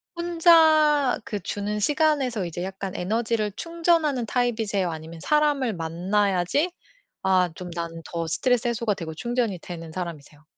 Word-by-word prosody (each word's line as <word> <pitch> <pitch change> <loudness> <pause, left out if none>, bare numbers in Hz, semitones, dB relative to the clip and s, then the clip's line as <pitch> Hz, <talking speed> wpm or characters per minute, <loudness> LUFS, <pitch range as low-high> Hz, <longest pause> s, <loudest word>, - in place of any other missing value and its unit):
혼자 320 -5 +4
그 205 - -4
주는 205 +3 -3
시간에서 285 - +1
이제 175 +1 -5
약간 190 0 -5
에너지를 220 +2 -1
충전하는 330 -6 +1
타입이세요, 220 -6 0
아니면 160 +1 -8
사람을 295 -5 +2
만나야지 185 - 0 0.5
아 185 -2 +3
좀 180 -1 -7
나는 165 -1 -5
더 170 -1 -2
스트레스 240 +8 +1
해소가 235 -2 0
되고 165 -4 -6
충전이 235 0 -1
되는 165 -1 -8
사람이세요? 155 -4 -7
210 Hz, 340 characters per minute, -25 LUFS, 175-280 Hz, 0.5 s, 혼자